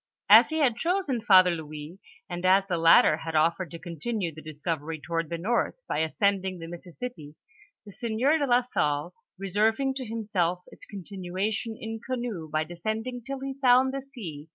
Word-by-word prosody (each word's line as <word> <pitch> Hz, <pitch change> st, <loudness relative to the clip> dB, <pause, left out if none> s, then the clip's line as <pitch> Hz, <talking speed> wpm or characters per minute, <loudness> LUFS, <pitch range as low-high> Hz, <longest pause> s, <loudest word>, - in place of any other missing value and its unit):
As -, -, +9 dB
he 315 Hz, -, -2 dB
had 260 Hz, -7 st, +2 dB
chosen 330 Hz, -, 0 dB
Father 185 Hz, -5 st, +6 dB
Louis, 155 Hz, +1 st, -7 dB, 0.3 s
and 175 Hz, -2 st, -6 dB
as 190 Hz, +1 st, +4 dB
the 180 Hz, -4 st, -2 dB
latter 165 Hz, -2 st, +6 dB
had 160 Hz, 0 st, -6 dB
of 160 Hz, +2 st, +4 dB
fered 185 Hz, -3 st, -6 dB
to 170 Hz, -, -8 dB
continue 170 Hz, +2 st, -4 dB
the 155 Hz, -, -10 dB
discovery 155 Hz, 0 st, -4 dB
toward 165 Hz, +1 st, -3 dB
the 170 Hz, -, -3 dB
north, 220 Hz, +8 st, 0 dB
by -, -, -1 dB
ascend 195 Hz, +5 st, +1 dB
ing 190 Hz, -1 st, -4 dB
the 165 Hz, -, -8 dB
Missisipi, 175 Hz, -1 st, -8 dB, 0.5 s
the 205 Hz, -, -11 dB
sieur 240 Hz, +9 st, +1 dB
do 285 Hz, -, 0 dB
la 245 Hz, 0 st, +4 dB
Salle 150 Hz, -7 st, -1 dB, 0.2 s
reserving 215 Hz, +8 st, +1 dB
to 265 Hz, -1 st, -5 dB
himself 200 Hz, -6 st, -1 dB
its -, -, -13 dB
continuation 200 Hz, +3 st, -4 dB
in 225 Hz, 0 st, -5 dB
canoe 240 Hz, -11 st, -4 dB
by 155 Hz, +1 st, 0 dB
descending 220 Hz, +9 st, -4 dB
till 270 Hz, +2 st, -6 dB
he 270 Hz, 0 st, -4 dB
found 260 Hz, +1 st, +5 dB
the 275 Hz, -, -3 dB
sea. 180 Hz, -, -9 dB
190 Hz, 180 wpm, -27 LUFS, 165-240 Hz, 0.5 s, As